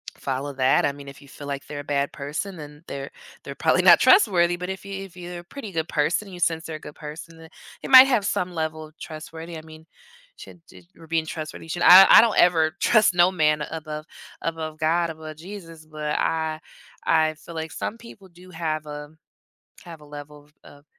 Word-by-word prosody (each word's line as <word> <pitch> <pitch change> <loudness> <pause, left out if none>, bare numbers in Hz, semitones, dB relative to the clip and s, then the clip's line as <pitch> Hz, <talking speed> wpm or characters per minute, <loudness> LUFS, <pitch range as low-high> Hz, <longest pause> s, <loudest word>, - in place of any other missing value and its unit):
follow 135 +1 -4
that 130 0 +2
I - - +1
mean, 140 0 -12
if 140 +1 -12
you 140 - -16
feel 140 +1 -11
like 140 -1 -5
they're 145 -1 -6
a - - -12
bad 140 -1 -1
person, 150 +7 -5
then 150 0 -11
they're 140 0 -7 0.3
they're - - -7
probably - - +2
not - - +8
trustworthy, 175 - +4
but 180 +1 -6
if 190 0 -6
you 195 0 -6
if 190 -3 -13
you're 175 0 -8
a - - -12
pretty 220 +3 -9
good 160 -2 -3
person, 170 +7 0
you 180 - -10
sense 165 -1 0
they're 160 -1 -6
a - - -18
good 150 - -11
person, 160 +2 -10
then 160 0 -14 0.3
they - - -5
might 260 0 +10
have 240 -7 +1
some 180 -2 -2
level 160 -1 -3
of 155 +2 -24
trustworthy 160 +1 -9
I - - -8
mean 155 0 -15 0.5
should 175 - -13
j - - -16
your 165 - -16
being 160 0 -1
trustworthy 155 0 -7
should 175 +2 -5
I 190 +2 +10
I - - +9
don't 225 -1 +1
ever 165 -3 +4
trust 215 -5 +4
no 175 +1 +5
man 155 -4 +1
above 155 -1 -7 0.4
above 160 -1 -5
God, 165 +2 +1
above 155 -1 -10
Jesus. 165 -2 -11
But 155 -1 -4
I 160 -1 -1 0.4
I 155 -1 +2
feel 165 +2 -13
like 160 0 -5
some 225 - -5
people 230 -4 -14
do 180 +1 -17
have 160 -3 -4
a 150 0 -8 0.8
have 165 -3 -11
a 150 - -16
level 145 0 -11
of 150 - -28
of 145 0 -17
160 Hz, 215 wpm, -23 LUFS, 150-175 Hz, 0.8 s, might